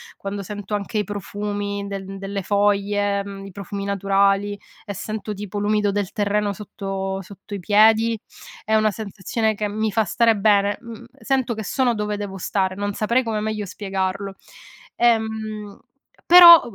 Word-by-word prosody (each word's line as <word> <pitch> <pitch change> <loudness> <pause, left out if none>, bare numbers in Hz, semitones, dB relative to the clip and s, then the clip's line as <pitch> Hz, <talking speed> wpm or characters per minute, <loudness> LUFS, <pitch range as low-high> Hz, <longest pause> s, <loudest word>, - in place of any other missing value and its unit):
quando 200 0 -5
sento 205 +1 -7
anche 205 +2 -2
i - - +1
profumi 205 0 -4
de 195 -1 -5
delle 195 0 -4
foglie, 205 0 +1
mhmm, 195 -1 -8
i - - -10
profumi 200 +1 -6
naturali, 200 +1 +1 0.3
e 205 - -5
sento 215 +2 -5
tipo 205 0 -5
l'umido 210 0 +1
del 200 -2 -2
terreno 205 0 0
sotto 195 -1 -4
sotto 195 +2 -12
i 200 - -3
piedi, 220 +4 +4 0.5
è 220 - +1
una 215 0 +3
sensazione 215 +1 -2
che 210 0 -2
mi 215 +1 -1
fa 220 +1 +2
stare 230 +3 +3
bene. 200 -1 +3
Mhmm, 230 0 -10 0.2
sento 265 -3 0
che 220 -1 -6
sono 255 0 +1
dove 210 -1 -2
devo 205 -2 -5
stare, 190 0 -1
non 205 0 -2
saprei 235 +5 +1
come 220 -2 -2
meglio 215 -1 -2
spiegarlo. 195 0 -3 0.6
Ehm, 220 -3 0 0.5
però 345 -1 +11
205 Hz, 160 wpm, -22 LUFS, 200-215 Hz, 0.6 s, però